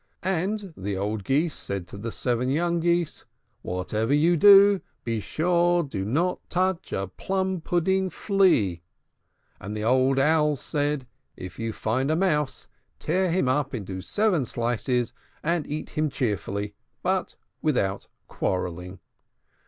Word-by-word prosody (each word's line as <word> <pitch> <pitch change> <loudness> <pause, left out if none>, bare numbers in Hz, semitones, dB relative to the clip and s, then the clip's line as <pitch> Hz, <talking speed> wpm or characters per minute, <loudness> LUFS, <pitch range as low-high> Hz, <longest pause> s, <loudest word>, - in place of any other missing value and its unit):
And 190 +1 -1
the 95 0 -3
old 105 +1 -2
Geese 150 - +1
said 95 -3 -5
to - - -9
the 115 +2 -4
seven 125 +2 -1
young 170 +4 +1
Geese, 170 -1 0 0.4
"Whatever 110 +8 -1
you 165 +4 +4
do, 200 +2 +7 0.2
be 115 -2 -1
sure 175 - +2
you 145 - -9
do 95 -6 -3
not 170 - 0
touch 185 -1 0
a 95 - -1
plum 190 - -2
pudding 190 +3 +1
flea." 175 - +2 0.8
And 105 +1 -6
the 105 - -3
old 130 +3 +3
Owls 150 0 +3
said, 145 -2 -1 0.3
"If 90 -1 -8
you 115 0 -2
find 120 +6 -1
a 155 - +2
mouse, 150 -7 0 0.3
tear 185 +3 0
him 175 -4 +1
up 140 +1 0
into 95 -4 -5
seven 205 - +1
slices, 120 +1 -1 0.3
and 165 -1 0
eat 150 +1 -5
him 155 0 0
cheerfully, 105 -4 -2 0.3
but - - 0 0.3
without 100 -10 0 0.2
quarrelling." 90 0 -3
145 Hz, 140 wpm, -26 LUFS, 110-175 Hz, 0.8 s, do